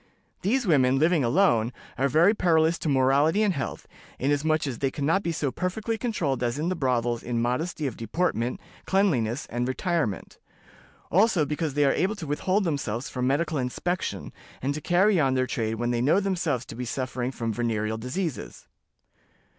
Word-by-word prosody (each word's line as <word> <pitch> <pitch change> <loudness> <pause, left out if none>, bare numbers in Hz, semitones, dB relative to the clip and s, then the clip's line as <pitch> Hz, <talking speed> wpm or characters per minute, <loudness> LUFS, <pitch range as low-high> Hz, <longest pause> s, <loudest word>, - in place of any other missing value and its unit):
These 240 +6 +1
women, 135 -7 +3
living 160 +1 +3
alone, 120 - +3 0.2
are 135 - +1
very 170 +9 +5
perilous 165 -4 +2
to 155 - -2
morality 140 +8 +3
and 205 -3 +2
health, 135 - -4 0.3
inasmuch 145 +3 +1
as 130 -5 -4
they 135 - +1
can 140 +1 -4
not 165 +6 +2
be 170 - -2
so 145 -4 -1
perfectly 205 - -2
controlled 180 - -2
as 120 +1 -1
in 160 +4 -1
the 185 - -1
brothels 120 -5 0
in 120 -1 -2
modesty 145 +7 -1
of 130 - -3
deportment, 120 - -1 0.3
cleanliness, 140 - +1
and 120 +2 -1
retirement; 145 - -2 0.7
also 185 -3 +4
because 150 0 -3
they 145 -1 +3
are 135 - +3
able 195 +4 0
to 190 -6 -7
withhold 185 +8 0
themselves 135 - -2
from 125 -1 -2
medical 155 +2 0
inspection, 175 +8 -3 0.3
and 140 +2 -1
to 155 - -5
carry 185 +4 +3
on 135 -3 +2
their 130 0 +2
trade 115 -3 -2
when 120 +2 -1
they 120 -1 0
know 150 +9 +4
themselves 170 - -1
to - - -9
be 125 - -4
suffering 125 0 -3
from 115 -3 -3
venereal 110 -1 -1
diseases. 125 - -4
145 Hz, 180 wpm, -26 LUFS, 125-175 Hz, 0.7 s, very